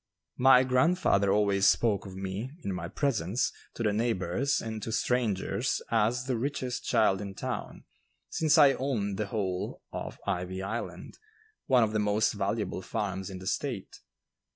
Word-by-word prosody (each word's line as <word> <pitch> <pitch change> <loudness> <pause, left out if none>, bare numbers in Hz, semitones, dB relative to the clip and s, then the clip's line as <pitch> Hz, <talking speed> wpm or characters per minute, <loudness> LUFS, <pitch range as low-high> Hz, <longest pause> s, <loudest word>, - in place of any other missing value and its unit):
My 130 0 +7
grandfather 130 - +3
always 100 -1 +3
spoke 105 -4 +2
of 95 - -9
me 95 +5 -4
(in 100 - -2
my 85 -2 -4
presence) 115 - 0 0.2
to 120 - -3
the 105 -2 +2
neighbors 110 +3 0
and 110 -1 -5
to 110 - -4
strangers 110 -2 0
as 115 +2 +2
the 130 -3 -1
richest 130 -1 -3
child 100 -2 +3
in 100 -1 -6
town, - - -5 0.4
since 155 0 +2
I 145 -3 +7
owned 110 -8 -2
the 105 - -1
whole 95 -4 -3
of - - -5
"Ivy 90 +1 -2
Island," 110 +5 -5 0.5
one 125 -3 +5
of 110 - 0
the 110 - +1
most 105 +1 +2
valuable 105 -1 -2
farms 95 0 -3
in 95 - -7
the 95 - -10
State. 120 0 -3
105 Hz, 155 wpm, -29 LUFS, 95-125 Hz, 0.5 s, My